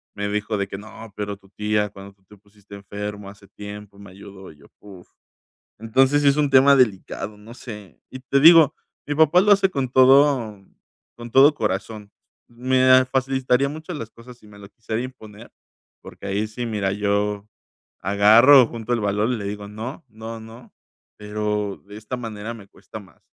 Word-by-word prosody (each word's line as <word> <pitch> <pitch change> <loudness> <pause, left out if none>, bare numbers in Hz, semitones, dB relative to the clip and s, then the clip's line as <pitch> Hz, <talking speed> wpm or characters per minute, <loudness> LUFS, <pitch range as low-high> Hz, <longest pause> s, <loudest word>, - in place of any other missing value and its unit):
me 100 0 -3
dijo 105 +1 -3
de 100 -1 -2
que, 95 - -8
no, 110 +1 -13
pero 105 -1 -5
tu 100 -1 -24
tía, 105 0 -1
cuando 100 0 -13
tú 100 -1 -38
te 105 - -18
pusiste 100 0 -21
enfermo 105 0 -8
hace 100 0 -16
tiempo 105 0 -11
me 100 -1 -13
ayudó". 95 -1 -13
Y 75 - -20
yo, 70 - -20
uf. 95 -4 -15 0.7
Entonces, 130 +6 +2
sí 145 - +2
es 140 - 0
un 150 -1 +1
tema 135 +1 +6
delicado, 105 -4 -1
no 105 +3 -14
sé. 105 - -11
Y 130 - -9
te 135 +2 0
digo, 160 0 +7 0.3
mi 145 - -2
papá 160 +3 +4
lo 210 +2 +2
hace 195 -1 +4
con 135 -8 -3
todo 130 -4 +4 0.6
con 120 0 -9
todo 140 +4 +6
corazón. 105 -3 -4 0.4
Me, 130 +2 -1
ah, 130 0 +6
facilitaría 130 0 0
mucho 160 +4 -8
las 115 -8 -7
cosas 120 +2 -15
si 110 - -20
me 105 -1 -16
lo 100 -1 -13
quisiera 110 +1 -5
imponer, 110 -3 -11 0.5
porque - - -13
ahí 100 +2 -2
sí, 120 +3 -6
mira, 105 -4 -2
yo 105 0 -2 0.5
agarro, 110 +8 +6
junto 115 +1 -5
el 120 - -1
valor 105 +2 -1
y 125 - -2
le 105 - -7
digo: 100 0 -6
"No, 115 +9 -8
no, 110 +1 -9
no". 115 +2 -14 0.4
Pero 105 -1 -3
de 105 +1 -11
esta 110 +4 -7
manera 115 -1 -7
me 105 -4 -14
cuesta 110 - -12
más. 95 -5 -19
110 Hz, 190 wpm, -21 LUFS, 100-130 Hz, 0.7 s, digo